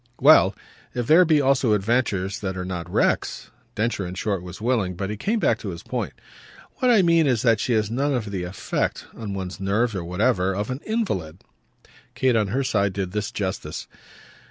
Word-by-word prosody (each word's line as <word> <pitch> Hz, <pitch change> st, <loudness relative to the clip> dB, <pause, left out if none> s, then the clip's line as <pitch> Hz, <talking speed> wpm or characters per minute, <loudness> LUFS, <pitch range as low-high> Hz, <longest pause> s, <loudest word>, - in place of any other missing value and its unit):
"Well 130 Hz, -9 st, +6 dB, 0.4 s
if 120 Hz, -1 st, -1 dB
there 165 Hz, +7 st, +6 dB
be 155 Hz, -2 st, +4 dB
also 135 Hz, -4 st, +3 dB
adventures 100 Hz, -2 st, 0 dB
that 95 Hz, -2 st, -4 dB
are 90 Hz, -, -3 dB
not 90 Hz, -3 st, -5 dB
wrecks!" -, -, 0 dB, 0.2 s
Densher 110 Hz, -2 st, -1 dB
in 90 Hz, 0 st, -6 dB
short 100 Hz, -1 st, -1 dB
was 90 Hz, 0 st, -9 dB
willing, 110 Hz, -6 st, 0 dB
but 95 Hz, +3 st, -3 dB
he -, -, -3 dB
came 215 Hz, -, -1 dB
back -, -, +2 dB
to -, -, -5 dB
his -, -, -7 dB
point. -, -, -3 dB, 0.6 s
"What 255 Hz, -2 st, +2 dB
I 220 Hz, -6 st, +5 dB
mean 165 Hz, -3 st, +4 dB
is 125 Hz, -3 st, +1 dB
that 115 Hz, -3 st, +4 dB
she 120 Hz, -, 0 dB
has 110 Hz, -1 st, +1 dB
none 140 Hz, +5 st, 0 dB
of 110 Hz, -5 st, -3 dB
the 95 Hz, -2 st, -3 dB
effect 90 Hz, +2 st, -3 dB
on 105 Hz, -3 st, -5 dB
one's 95 Hz, -1 st, -5 dB
nerves 105 Hz, +4 st, +1 dB
or 95 Hz, -3 st, -3 dB
whatever 90 Hz, +1 st, +1 dB
of 105 Hz, +4 st, -2 dB
an 130 Hz, -, -3 dB
invalid." 95 Hz, -, -2 dB, 0.7 s
Kate 130 Hz, -2 st, +2 dB
on 110 Hz, -2 st, +2 dB
her 130 Hz, +8 st, 0 dB
side 100 Hz, -6 st, +1 dB
did 95 Hz, -2 st, -3 dB
this 105 Hz, +2 st, -3 dB
justice. 95 Hz, -5 st, -4 dB
105 Hz, 200 wpm, -24 LUFS, 95-130 Hz, 0.7 s, Well